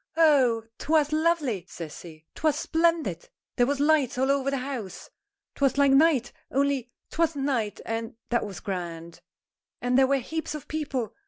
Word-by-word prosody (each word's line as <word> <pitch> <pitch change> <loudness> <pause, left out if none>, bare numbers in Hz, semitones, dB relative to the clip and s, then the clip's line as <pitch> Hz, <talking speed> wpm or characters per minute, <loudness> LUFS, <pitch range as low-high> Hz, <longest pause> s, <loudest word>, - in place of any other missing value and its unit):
"Oh! 265 -8 +4 0.2
'twas 305 -1 +2
lovely!" 305 - +1
says 160 -3 -8
he. 160 -2 -13
"'Twas 310 -3 +1
splendid! 325 - 0 0.3
There 245 - +3
was 285 0 0
lights 290 -3 +2
all 265 +2 +2
over 275 -1 +1
the 275 - -1
house. 255 -7 -6 0.4
'Twas 275 -1 +1
like 280 -1 +5
night 275 -3 +4 0.2
only 275 -2 0 0.2
'twasn't 315 -4 0
night, 230 -7 -1
and 225 0 -4
that 235 - +1
was 200 -3 -7
grand! 170 -4 -6 0.6
And 250 +1 +2
there 265 - +5
were 275 +1 +3
heaps 315 +4 -4
of 300 - -8
people. 275 -7 -3
270 Hz, 160 wpm, -26 LUFS, 225-300 Hz, 0.6 s, like